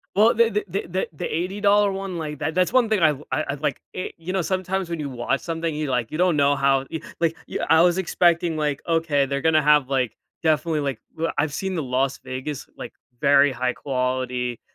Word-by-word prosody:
Well, 220 +3 +5
the 230 0 +4
the 210 0 -2
the 185 +1 -3
the 185 +2 -2
the - - -5
$80 200 +3 +2
one, 195 -2 -4
like, 150 -2 -5
that 155 +3 -2
that's 185 +6 +2
one 245 -4 +4
thing 215 -3 +2
I 160 - +6
l 145 -1 -3
I 155 - 0
I'd 140 +1 -4
like 145 -4 -1
you 185 0 -5
know, 190 - +1
eh, - - +2
sometimes 185 0 -2
when 170 -2 -3
you 145 -2 -3
watch 125 +2 -1
something, 165 -1 -3
you, 150 -2 -2
like 125 -3 -1
you 155 - -3
don't 180 -3 +3
know 140 0 +3
how 135 -1 +2
y 160 - -3 0.2
like, 165 -1 +1
y - - -4
I 160 0 +6
was 175 +1 +4
expecting, 170 -2 +2
like, 150 -2 -1
"Okay, 160 -4 +2
they're 140 0 -2
gonna 160 -1 +4
have, 150 -2 +4
like, 130 -5 0 0.3
definitely, 160 0 +1
like" 140 -5 -2 0.2
well, 165 +1 -1
I've 145 -1 0
seen 190 -1 -3
the 160 - -1
Las 130 +1 0
Vegas, 130 +2 -5
like, - - -8 0.3
very 140 0 +5
high-quality. 125 -1 -2
155 Hz, 225 wpm, -23 LUFS, 140-180 Hz, 0.3 s, I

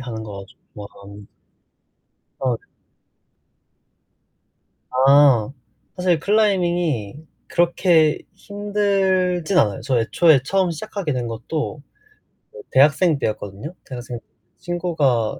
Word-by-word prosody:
하는 115 -3 -6
거 100 -2 -8 0.3
좋아합 105 -1 -10 1.5
아 130 -1 -1
네. - - -32 2.2
아 135 -2 +4 0.4
사실 180 -3 +1
클라이밍이 175 - 0 0.2
그렇게 170 -2 +2 0.2
힘들진 195 -3 0
않아요. 105 - +2
저 130 -3 0
애초에 150 +5 +3
처음 185 +4 0
시작하게 185 -1 -4
된 125 -2 -3
것도 150 +6 -5 0.7
어 475 - -11
대학생 150 +3 +4
때였거든요. 105 - -5
대학생 120 -2 -7
때 - - -37 0.3
친구가 155 -10 -1
155 Hz, 210 characters per minute, -21 LUFS, 120-180 Hz, 2.2 s, 아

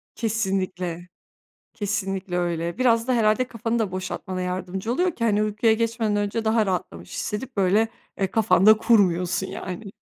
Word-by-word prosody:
Kesinlikle, 190 -5 -2 0.7
kesinlikle 195 -3 -2
öyle. 170 -1 -2
Biraz 235 -2 +3
da 255 - +2
herhâlde 230 +1 +2
kafanı 230 0 -2
da 210 -4 -1
boşaltmana 185 0 -4
yardımcı 185 +3 -3
oluyor 360 +5 +1
ki, 230 - -4
hani, 210 -2 +2
uykuya 215 +2 +2
geçmeden 225 -1 0
önce 205 +2 -1
daha 220 -1 +3
rahatlamış 90 - -4
hissedip, 225 +2 -4
böyle, 200 +4 +3 0.3
eee, 195 - +2
kafanda 210 -1 +5
kurmuyorsun 190 -5 +2
yani. 190 +3 -6
205 Hz, 145 wpm, -24 LUFS, 185-225 Hz, 0.7 s, kafanda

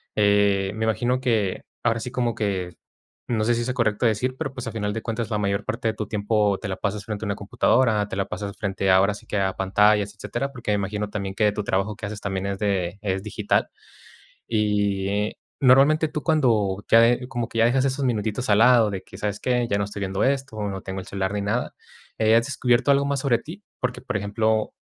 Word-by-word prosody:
eh, 100 -2 +3
me 110 0 -1
imagino 120 +4 +1
que 110 -7 0 0.2
ahora 115 0 +1
sí 125 - -6
como 120 -2 -1
que, 95 -4 -2 0.6
no 110 -3 +1
sé 120 0 +3
si 120 - -1
sea 130 - -1
correcto 115 -2 0
decir, 125 +4 +1
pero, 135 -4 -4
pues, 130 -2 -6
a - - -3
final 105 -2 -2
de 115 - -4
cuentas 115 0 -3
la 105 - 0
mayor 100 0 -1
parte 115 0 -2
de 110 - -1
tu 105 -1 -5
tiempo 105 -2 +1
te 105 - -4
la 95 - -2
pasas 100 +1 -3
frente 110 -1 -5
a - - -3
una 100 - -1
computadora, 110 0 +2
te - - -6
la 100 0 0
pasas 100 -1 -6
frente 95 -1 -1
ahora 95 +2 +5
sí 100 - -12
que 105 - -2
a 95 -1 0
pantallas, 105 +2 +2
etcétera. 120 +6 -4
Porque 120 -5 -4
me - - +3
imagino 105 +1 -2
también 100 -2 -4
que 105 -1 +3
tu 105 +1 -3
trabajo 100 +2 -1
que 105 - -7
haces 105 0 -5
también 95 -1 -3
es 100 -1 -3
de 95 -3 -1
es 95 -1 -2
digital. 105 - 0 0.8
Y 105 -1 0 0.3
normalmente, 140 +4 +5
tú 150 0 -4
cuando 110 - +2
ya 115 - +7
de 120 +2 +3
como 120 -2 -3
que 115 - -6
ya 115 - +5
dejas 130 +3 +2
esos 135 0 -1
minutitos 110 0 -1
al 105 +1 +5
lado 120 -2 +6
de 95 -1 -5
que, - - -13
¿sabes 105 0 -3
qué?, 125 -1 0
ya 100 - +1
no 100 - +1
estoy 105 0 -7
viendo 95 0 -1
esto, 135 -5 -1
no 95 -2 -3
tengo 95 0 -5
el 95 - -8
celular 95 0 -2
ni 105 - -1
nada, 110 +5 -1 0.5
eh, 110 +1 +4
¿has 115 0 +3
descubierto 125 -1 +2
algo 140 0 +3
más 140 -1 0
sobre 125 -4 +2
ti? 185 +7 -10 0.2
Porque, 125 0 -2
por - - -5
ejemplo, 110 +2 0
105 Hz, 230 wpm, -24 LUFS, 100-120 Hz, 0.8 s, ya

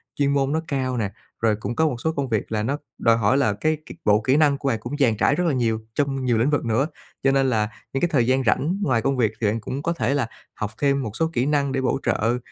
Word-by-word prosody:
chuyên 140 -1 +1
môn 140 -1 +1
nó 160 +1 0
cao 130 -4 -1
nè, 105 -4 -1 0.3
rồi 110 -2 +3
cũng 110 +3 -5
có 160 - +3
một 135 - -1
số 160 - +1
công 140 -3 -2
việc 110 -2 -1
là 105 -1 0
nó 135 +6 -1 0.2
đòi 115 0 +3
hỏi 115 +4 +2
là 120 -7 +2
cái 155 +10 0
cái - - -10
bộ 105 +1 +4
kỹ 130 +6 +2
năng 145 -3 +4
của 140 - -4
bạn 115 -4 0
cũng 120 +6 -5
dàn 120 -7 +2
trải 140 - +3
rất 180 - 0
là 160 - +2
nhiều 115 -4 +1 0.2
trong 135 -2 0
nhiều 120 -3 +2
lĩnh 120 +6 +2
vực 145 -3 0
nữa. 120 +6 +1 0.4
Cho 135 - +4
nên 135 -1 +2
là 110 -2 +1 0.2
những 135 - -1
cái 175 - +3
thời 120 -5 +2
gian 130 +1 +2
rảnh 160 +8 +1
ngoài 130 - +2
công 135 +2 0
việc 115 -4 +2
thì 110 - +2
bạn 110 +2 0
cũng 135 +5 -5
có 170 - 0
thể 125 -4 0
là 140 -5 0 0.3
học 105 -1 -4
thêm 140 -1 +2
một 110 - -4
số 160 +5 +1
kỹ 120 +1 +1
năng 140 -1 +1
để 135 0 -1
bổ 130 +1 0
trợ 115 +3 +1
130 Hz, 290 wpm, -23 LUFS, 115-140 Hz, 0.4 s, bộ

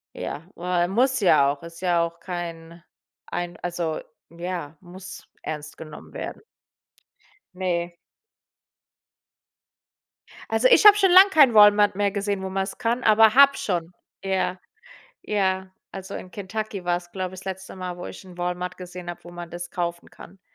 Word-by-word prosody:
Ja, 145 - -5
äh, 175 0 0
muss 255 +7 +2
ja 155 -8 +4
auch 140 - -8
ist 170 +1 -11
ja 175 -2 +2
auch 170 0 -5
kein 170 -1 -7 0.4
ein, 175 0 -4
also, 170 -2 -3 0.3
ja 170 -2 -6
muss 185 +1 -11 0.2
ernst 150 -1 -6
genommen 155 -1 -11
werden. - - -6 1.1
Ne. 175 -2 -2 2.6
Also, - - +4
ich 470 -3 +7
habe 415 0 +9
schon 385 -3 +4
lang 375 +2 +9
keinen 285 - +6
Walmart 205 -1 +6
mehr 205 0 +1
gesehen, 200 0 -2
wo 190 - -4
man's 195 +3 -3
kann, 240 +1 -1
aber 220 0 +5
habe 280 0 +7
schon. 175 -3 -3 0.3
Ja, 190 -1 -1 0.6
ja, 190 -2 -1 0.2
also 195 +1 -7
in 180 - -10
Kentucky 205 -1 -5
war's, 175 0 -2
glaube 185 -1 -4
ich, 185 - -9
das - - -16
letzte 190 0 -7
Mal, 180 -1 -5
wo 180 - -7
ich - - -10
'n 180 -2 -14
Walmart 180 0 -3
gesehen 180 -1 -9
habe, 175 - -7
wo 175 - -12
man 175 -1 -9
das 175 0 -7
kaufen 170 -1 -4
kann. 190 +2 -15
180 Hz, 160 wpm, -24 LUFS, 175-200 Hz, 2.6 s, habe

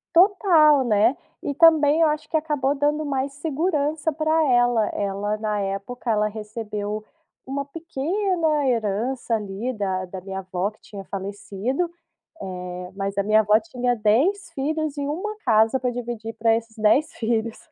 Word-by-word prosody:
Total, 335 -6 +5
né. 225 +4 +3 0.3
E 285 - -3
também 315 0 +5
eu 320 - +6
acho 305 0 -3
que - - -3
acabou 295 -3 +1
dando 295 +2 0
mais 275 -1 -1
segurança 305 +1 -1
pra 315 +1 +1
ela. 245 -3 +3
Ela, 205 +1 -2
na 210 -1 -2
época, 200 +5 -4
ela 210 -1 +2
recebeu 210 -1 -5 0.4
uma 275 +1 -3
pequena 330 0 -1
herança 230 +1 0
ali, 210 +4 -3
da 190 -3 -2
da 185 +1 -8
minha 190 0 -5
avó 185 +1 -2
que 215 - -28
tinha 200 -2 -9
falecido, 200 - -3 0.5
eh, 180 0 -6
mas 195 0 -3
a 200 - +2
minha 215 +1 +4
avó 210 0 +4
tinha 250 -6 -1
10 295 - +2
filhos 305 +1 -2
e 285 - -2
1 400 +8 -3
casa 225 +2 +4
pra 250 - 0
dividir 235 -2 -5
pra 225 0 +2
esses 230 0 -6
10 220 +8 +3
filhos. 225 0 -1
240 Hz, 155 wpm, -23 LUFS, 210-300 Hz, 0.5 s, eu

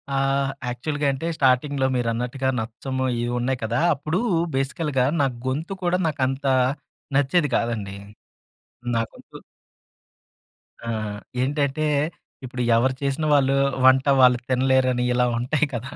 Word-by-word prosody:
ఆహ్, 135 0 +1 0.2
యాక్చువల్‌గా 145 +4 -2
అంటే 135 +5 -4
స్టార్టింగ్‌లో 135 +1 +2
మీరన్నట్టుగా 125 +2 -1
నచ్చము 130 +4 -4 0.2
ఏవో 120 0 -2
ఉన్నాయి 125 +1 -1
కదా! 110 - 0 0.2
అప్పుడు 155 +5 -2 0.4
బేసికల్‌గా 135 0 0 0.2
నా - - +4 0.2
గొంతు 155 +9 -2
కూడా 175 +1 +2
నాకు 150 -3 -3
అంత 135 +2 -4 0.7
నచ్చేది 145 +2 +2
కాదండి. 105 -4 -3 1.0
నా - - +2
గొంతు - - -14 1.5
ఆ! - - -3 0.5
ఏంటంటే 140 +2 0 0.6
ఇప్పుడు 125 0 -5
ఎవరు 130 +3 +2
చేసిన 140 +2 -1
వాళ్ళు 135 -1 +3 0.3
వంట 130 +1 +5
వాళ్ళు 125 -1 +6
తినలేరని 130 -1 +2
ఇలా 125 0 +2
ఉంటాయి 140 +5 +1
కదా! 120 +3 -5
130 Hz, 120 wpm, -23 LUFS, 125-140 Hz, 1.5 s, వాళ్ళు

